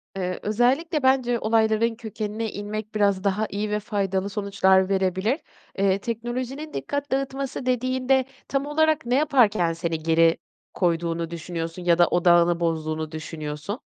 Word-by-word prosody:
Eee, 185 -1 -3
özellikle 265 - +1
bence 255 -3 +3
olayların 220 +1 +2
kökenine 220 -1 -4
inmek 215 +1 -6
biraz 200 -3 +2
daha 205 +2 0
iyi 210 +2 -3
ve 210 - 0
faydalı 200 -2 -1
sonuçlar 195 -2 +2
verebilir. 190 - +1 0.4
Eee, 195 0 +2
teknolojinin 245 +7 -4
dikkat 285 0 -3
dağıtması 270 -1 -2
dediğinde 255 +1 +1 0.2
tam 275 0 -1
olarak 310 0 +1
ne 245 +1 +1
yaparken 220 - +3
seni 165 -2 -3
geri 165 0 +4 0.4
koyduğunu 170 -1 -1
düşünüyorsun 165 +1 -5
ya 170 -1 +3
da 175 -1 +5
odağını 175 -1 +4
bozduğunu 155 -2 -2
düşünüyorsun? 155 - -5
205 Hz, 135 wpm, -24 LUFS, 175-250 Hz, 0.4 s, da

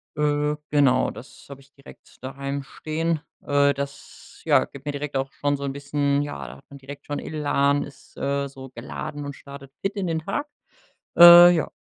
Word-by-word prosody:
Äh, 150 0 0 0.2
genau, 140 -4 +3
das - - -13
hab 140 -1 -10
ich 140 +1 -22
direkt 140 -1 -18
daheim 140 +1 -5
stehen. 160 +3 -3 0.3
Äh, 140 0 +3
das, 140 0 -9
ja, - - +4
gibt 140 +1 -14
mir 145 - -3
direkt 145 -1 -4
auch 135 0 -3
schon 145 0 -1
so 140 - -8
'n 135 - -3
bisschen 140 0 -1
ja, 70 - -6
da 65 +2 -11
hat - - -21
man 140 - -12
direkt 140 +1 -11
schon 145 - -4
Elan, 145 -2 0
ist, 145 - -15
äh, 140 0 -1
so 135 -1 -11
geladen 145 +4 -7
und 140 - -6
startet 140 -1 -12
fit 195 +2 -2
in 190 -2 -2
den 165 -1 -1
Tag. 290 - -4 0.7
Äh, 175 0 +11
ja. 160 - -1
140 Hz, 195 wpm, -23 LUFS, 140-150 Hz, 0.7 s, Äh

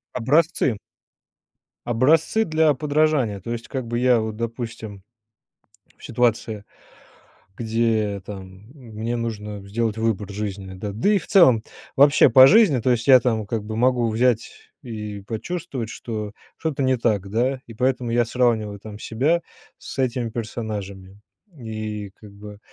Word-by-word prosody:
Образцы. 135 -1 +2 1.1
Образцы 155 - +2
для 155 -1 +3
подражания. 145 -6 +1
То 115 +6 -7
есть 115 0 -5
как 130 -2 -4
бы 120 0 -2
я 125 -1 +4
вот, 110 -1 -3
допустим, 115 -4 -6 0.9
в - - -13
ситуации, 115 -3 0 1.0
где, 110 -3 0
там 95 -2 -8 0.3
м 125 -7 -14
мне 115 +3 -3
нужно 105 -3 -5
сделать 110 +1 -1
выбор 110 -3 -1
жизненный, 100 -2 -5
да 100 +1 -5
да 115 - +1
и 200 - +4
в - - -11
целом 130 - +5 0.3
вообще 140 +1 +6
по 130 -1 +9
жизни, 195 - +5
то 125 +3 +1
есть 120 0 0
я 130 -2 +8
там 110 -3 -1
как 110 0 -3
бы 110 +1 -5
могу 125 -1 +2
взять 115 +1 -1
и 105 -4 -6
почувствовать, 115 - -5
что 105 -3 -6 0.2
что-то 155 -4 -2
не 130 0 +2
так, 105 -5 0
да. 125 +5 0
И 115 - -11
поэтому 125 +1 0
я 120 +1 +2
сравниваю 115 -4 0
там 105 0 -10
себя 145 +12 0 0.3
с - - -10
этими 125 -2 -1
персонажами. 105 -4 -6 0.4
И 110 -3 -5
как 105 -2 -13
бы 105 0 -11
115 Hz, 150 wpm, -22 LUFS, 105-130 Hz, 1.1 s, по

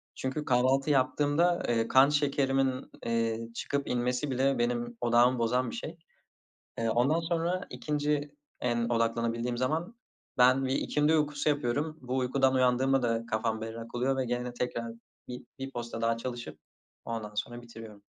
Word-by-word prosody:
Çünkü 135 +3 -3
kahvaltı 130 +3 +2
yaptığımda, 145 +5 +2
eee, 115 -1 +1
kan 135 +2 +6
şekerimin, 135 -2 +1 0.2
eee, 115 0 -1
çıkıp 140 0 -2
inmesi 125 +3 -1
bile 135 +1 +2
benim 120 0 -1
odağımı 120 +1 +4
bozan 125 +2 +1
bir - - -6
şey. 165 +2 -6 0.8
Eee, 115 -1 0
ondan 130 +8 +2
sonra, 170 +2 -1
2'nci 150 -1 -1 0.3
en 120 -1 0
odaklanabildiğim 115 +1 0
zaman 160 - -1 0.4
ben 130 +2 +5
bir 130 - 0
ikindi 150 +3 +1
uykusu 150 0 0
yapıyorum. 145 +3 -1
Bu 130 +1 -3
uykudan 130 +1 +2
uyandığımda 130 +1 +3
da 115 -1 0
kafam 110 0 -1
berrak 115 +1 -7
oluyor 135 +2 +1
ve 130 - 0
gene 125 0 -3
tekrar 120 -1 -3 0.4
bi 125 0 -8
1 135 0 -5
posta 120 -2 -5
daha 115 0 +1
çalışıp, 120 0 -6 0.5
ondan 110 -2 -4
sonra 120 +3 -4
bitiriyorum. 115 -3 -12
125 Hz, 150 wpm, -29 LUFS, 115-140 Hz, 0.8 s, kan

